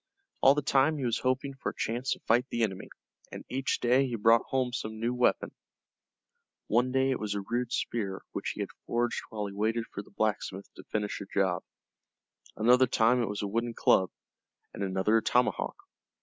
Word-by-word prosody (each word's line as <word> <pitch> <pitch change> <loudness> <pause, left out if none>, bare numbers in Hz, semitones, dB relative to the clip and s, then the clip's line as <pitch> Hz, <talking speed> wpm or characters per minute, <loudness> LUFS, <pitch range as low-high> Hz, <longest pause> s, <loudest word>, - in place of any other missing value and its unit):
All 135 +1 +7
the 150 - -1
time 140 +3 +3
he 135 - -2
was 115 -1 0
hoping 130 +2 -1
for 135 - -4
a - - -9
chance 120 +4 -1
to - - -9
fight 120 +3 +2
the 120 - 0
enemy, 95 -4 -3 0.4
and - - -8
each 135 +1 -1
day 130 +3 +3
he 120 - -3
brought 115 +1 +5
home 130 -2 0
some 110 -3 -4
new 120 +2 0
weapon. 125 0 +1 1.1
One 120 +3 +2
day 135 +1 +2
it 130 - -1
was 105 -1 -3
a 100 - -2
rude 120 0 -1
spear 100 -5 -2
which - - -3
he - - -4
had - - -4 0.2
forged 120 0 0
while 105 -2 -4
he 100 - -6
waited 110 +3 0
for - - -4
the - - -17
blacksmith 100 -2 -2
to - - -12
finish 105 -1 -2
a 100 - -7
job, 95 -3 +1 0.9
another 125 +4 +5
time 120 +1 +3
it 115 - -1
was 105 0 -3
a - - -1
wooden 115 +3 -2
club, 95 -1 +3 0.6
and - - -7
another 95 +3 +2
a - - +2
tomahawk. 125 +3 +1
115 Hz, 200 wpm, -29 LUFS, 105-125 Hz, 1.1 s, All